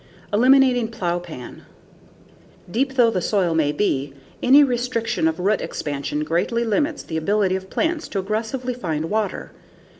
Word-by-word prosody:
Eliminating 250 +1 +4
Plowpan 175 - -5 1.1
Deep 265 +5 0
though 240 -3 +5
the 185 -4 -1
soil 185 -3 +1
may 155 -3 +2
be, 140 -7 -1 0.3
any 275 +4 +7
restriction 240 - 0
of 160 +1 -2
root 200 +3 +1
expansion 145 +1 -3
greatly 175 +9 0
limits 290 +7 0
the 160 - -4
ability 195 +3 +1
of 190 0 -6
plants 325 -1 -1
to - - -5
aggressively 220 +6 -2
find 165 -8 -3
water. 215 -1 -2
210 Hz, 140 wpm, -22 LUFS, 170-245 Hz, 1.1 s, any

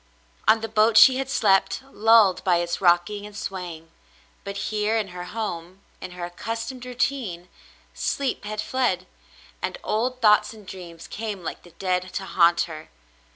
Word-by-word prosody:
On 220 +1 +5
the 225 - -3
boat 215 0 +3
she 260 +3 +8
had 265 0 -3
slept, 195 -1 +2
lulled 220 -4 +5
by 180 -2 +3
its 170 +1 -2
rocking 175 +3 +3
and 205 -1 -12
swaying, 175 -5 -6 0.5
but 200 0 -6
here 215 +1 +1
in 210 -3 -2
her 180 0 -7
home 185 -3 -5
— - - -35
in - - -6
her 175 - -3
accustomed 230 +8 -5
routine 240 -8 -2 0.3
— - - -32
sleep 275 -1 -2
had 210 0 -3
fled, 210 -7 0 0.6
and - - -3
old 250 +4 -1
thoughts 210 -1 +4
and 210 -2 -14
dreams 175 -3 -10
came 210 -4 -5
like - - -5
the 175 - -16
dead 185 -1 -1
to 195 - -3
haunt 170 -2 +4
her. 155 -1 -6
200 Hz, 170 wpm, -24 LUFS, 180-225 Hz, 0.6 s, she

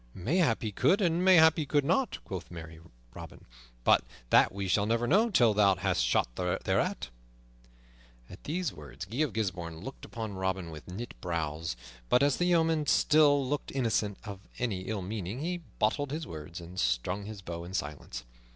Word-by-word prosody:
"Mayhap 130 - +1
he 110 - -2
could 190 - +3
and 175 -2 +1
mayhap 165 -4 +7
he 155 - -1
could 145 0 +2
not," 190 - +1
quoth 95 -3 -6
merry 80 -2 -9 0.3
Robin, - - -11 0.4
"but - - +5 0.3
that - - +6
we 100 0 -4
shall 100 +3 +2
never 115 +1 +1
know 210 - +4
till 120 - +4
thou 100 -2 +4
hast 90 -8 0
shot - - +2
thereat." 90 -1 -1 1.2
At 90 - -13
these 170 -1 -2
words 70 +1 -9
Guy 110 +7 -7
of 155 -4 +2
Gisbourne 85 -7 -3
looked 135 +6 -9
upon 110 -3 -6
Robin 95 -2 -2
with 75 -1 -10
knit 105 +7 -6
brows, 80 -4 -3 0.3
but, 125 - +4
as 140 -2 +3
the 175 - +1
yeoman 165 -3 +2
still 145 -2 +4
looked 145 +1 -2
innocent 110 -6 0
of 100 -4 -7 0.2
any 100 -7 -2
ill 105 -3 -2
meaning, 105 +4 -4
he 175 +2 -2 0.2
bottled 145 +6 +1
his 155 +3 -4
words 80 - -8
and 85 +2 -8
strung 65 +12 0
his 105 -2 -8
bow 85 -1 -6
in 90 +2 -7
silence. 75 -7 -5
105 Hz, 180 wpm, -30 LUFS, 90-145 Hz, 1.2 s, mayhap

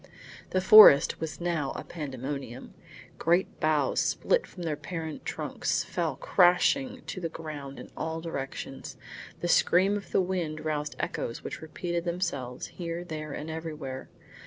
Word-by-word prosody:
The 185 - +1
forest 190 -7 +9
was 160 -1 -4
now 170 -6 -1
a - - -5
pandemonium. 135 -4 -6 0.5
Great 175 +3 +1
boughs, 150 -3 +2
split - - +1
from 180 - -9
their 160 -3 -1
parent 160 -1 -6
trunks, - - -1
fell - - -2
crashing 250 +9 +3
to 185 - -6
the 165 - -2
ground 150 -4 -7
in - - -10
all 160 0 -3
directions. 135 -4 -6 0.4
The 175 - -1
scream 185 +3 +4
of 200 -1 -6
the - - +3
wind 175 -5 -2
roused 150 -1 -2
echoes 115 - -3
which - - -6
repeated 170 +2 -3
themselves, 145 -8 -3 0.2
here, 170 0 -3
there 155 -3 -6
and 150 +2 -5
everywhere. 155 -5 -6
160 Hz, 145 wpm, -28 LUFS, 145-175 Hz, 0.5 s, forest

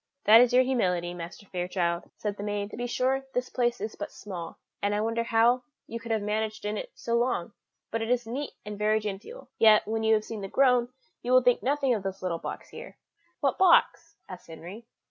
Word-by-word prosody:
"That 225 +2 +8
is 250 0 +4
your 250 +1 +5
humility, 180 -9 0
Master 175 +4 -8
Fairchild," 175 -2 -2
said 210 -2 -3
the 200 - -8
maid; 205 0 -3
"to - - -7
be 245 +1 -3
sure, 265 +2 0
this 250 0 -1
place 240 -1 0
is 215 +2 -5
but - - -6
small, 175 -5 -8 0.2
and 205 0 +1
I 210 - 0
wonder 230 +1 0
how 235 +2 +3 0.2
you 230 - -6
could 230 +1 -10
have 220 -2 0
managed 215 +1 -2
in 210 +1 -1
it - - -5
so 235 - -4
long, 235 -5 0 0.4
but 225 - -1
it 225 - -3
is 245 -1 +1
neat 265 +5 -4
and 210 0 -7
very 215 +1 +2
genteel; 210 - -7
yet, 215 -2 +6
when 220 +1 -1
you 220 0 +4
have 215 0 -1
seen 220 -2 -6
The 195 - -4
Grove, 250 +1 +3 0.3
you 245 - -3
will 255 0 +6
think 245 -1 +3
nothing 275 -1 +1
of 215 - -1
this 190 0 -5
little 170 -2 -2
box - - -7
here." - - -10 0.4
"What - - +1
box?" 335 -2 +4
asked 185 -1 -10
Henry. 175 +8 -10
220 Hz, 220 wpm, -28 LUFS, 200-245 Hz, 0.4 s, That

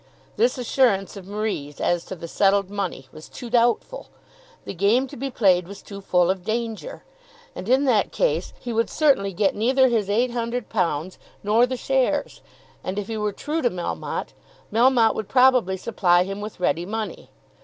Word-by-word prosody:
This 470 - +2
assurance 235 -6 +1
of 190 -2 -10
Marie's 200 -9 -4
as 175 -1 0
to 190 - -6
the 170 -1 -8
settled 200 +2 +2
money 190 -9 -4
was 155 - -12
too 240 -2 -9
doubtful! 240 - +1 0.6
The - - -5
game 205 +8 +2
to 265 - -11
be 275 +3 -4
played 185 -8 +2
was 200 +1 -10
too 200 -1 -9
full 180 -2 +2
of 190 -1 -5
danger! 230 - -4 0.5
And 190 - -6
in 265 +3 +4
that 235 -6 +2
case - - 0
he 240 - -5
would 230 +1 +1
certainly 275 -11 +2
get 195 +2 +1
neither 260 +4 +3
his 220 -4 0
£800, 225 -8 -1 0.2
nor 220 +4 +3
the 255 0 -3
shares. 270 +3 0 0.4
And 185 +2 -4
if 205 +1 -4
he 225 - -3
were 210 -1 -1
true 305 +10 -3
to 245 - +2
Melmotte, 170 - -4 0.4
Melmotte 235 -1 +4
would 215 - -5
probably 250 -7 +4
supply 180 -4 +2
him 195 +2 -6
with 210 -2 -7
ready 175 -1 0
money. 220 +1 -5
215 Hz, 175 wpm, -23 LUFS, 190-245 Hz, 0.6 s, in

